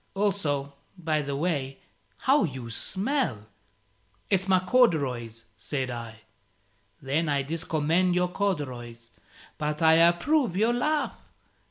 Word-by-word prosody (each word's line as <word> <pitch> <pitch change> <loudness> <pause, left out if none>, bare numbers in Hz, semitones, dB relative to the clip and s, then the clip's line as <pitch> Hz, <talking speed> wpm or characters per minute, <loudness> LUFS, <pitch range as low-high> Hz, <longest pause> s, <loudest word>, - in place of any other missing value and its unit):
Also, 155 -9 -1 0.2
by 155 -3 0
the 140 -1 -4
way, 140 -4 -2 0.4
how 270 -2 +3
you 130 -8 -4
smell!" 195 - -2 0.9
"It's 190 0 +2
my 190 -1 +5
corduroys," 140 - +1
said 130 0 -3
I. 115 -2 -7 0.8
"Then 150 +4 0
I 140 -1 +1
discommend 165 +3 +1
your 180 0 +1
corduroys. 125 -12 -4 0.5
But 150 +1 -2
I 160 0 +7
approve 180 - +3
your 225 +4 +3
laugh. 300 +5 0
160 Hz, 115 wpm, -27 LUFS, 135-190 Hz, 0.9 s, I